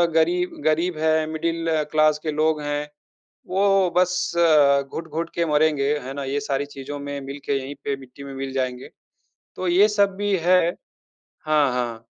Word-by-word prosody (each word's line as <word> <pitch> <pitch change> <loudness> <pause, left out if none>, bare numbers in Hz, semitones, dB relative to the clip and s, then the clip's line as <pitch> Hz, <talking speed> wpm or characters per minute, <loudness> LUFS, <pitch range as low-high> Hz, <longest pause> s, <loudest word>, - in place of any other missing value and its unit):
गरीब 175 +2 +2
गरीब 160 +2 +1
है, 160 0 +2
मिडल 165 -1 -1
क्लास 155 -1 +3
के 155 - -1
लोग 155 0 +1
हैं, 145 0 -3 0.6
वो 195 0 +3
बस 180 0 +2 0.6
घुट-घुट 165 +1 -4
के 170 -1 +1
मरेंगे, 150 -2 +2
है 130 +1 -7
ना? 140 0 -5
ये 135 +2 -1
सारी 140 0 -2
चीज़ों 145 0 -8
में 140 0 -5
मिल 140 +1 -7
के 140 -1 0
यही 135 +2 -6
पे 140 - -1
मिट्टी 135 +1 -13
में 140 -1 -8
मिल 135 0 -4
जाएँगे। 130 -1 -3 0.7
तो 185 - -2
ये 190 +4 +5
सब 200 -2 +2
भी 205 -1 0
है। 180 +2 +5 0.9
हाँ, 150 -4 +3
हाँ। 120 -2 -3
155 Hz, 165 wpm, -23 LUFS, 140-170 Hz, 0.9 s, ये